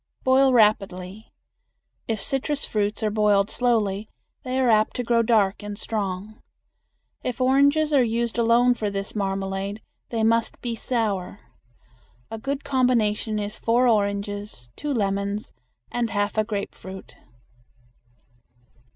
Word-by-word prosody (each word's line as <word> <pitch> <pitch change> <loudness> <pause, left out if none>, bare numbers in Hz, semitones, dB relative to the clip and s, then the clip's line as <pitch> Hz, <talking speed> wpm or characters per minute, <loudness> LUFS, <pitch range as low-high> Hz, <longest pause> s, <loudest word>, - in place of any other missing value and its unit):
Boil 265 +1 +5
rapidly. 205 -3 +1 0.8
If 225 -2 -1
citrus 280 +4 -1
fruits 210 +1 -1
are 215 - +1
boiled 205 -1 +2
slowly 220 -4 0 0.3
they 255 0 -2
are 260 - +3
apt 215 0 +2
to 245 - -2
grow 235 0 +3
dark 215 -4 +2
and 205 0 -6
strong. 210 -1 -4 0.8
If 250 - -3
oranges 285 +4 +3
are 275 - +6
used 235 0 -1
alone 235 +2 +4
for 215 -3 -2
this 200 +1 -4
marmalade 195 0 -2 0.3
they 225 -2 -1
must 230 0 +1
be 240 -2 -3
sour. 215 -5 -2 0.9
A 225 - -5
good 275 +4 -3
combination 235 -5 +1
is 210 0 -4
four 240 +2 +3
oranges, 205 - -1
two 295 - -4
lemons, 200 -2 -2 0.4
and 240 -1 -1
half 205 -1 -1
a 215 - +2
grapefruit. 200 -3 -6
220 Hz, 125 wpm, -24 LUFS, 200-240 Hz, 0.9 s, are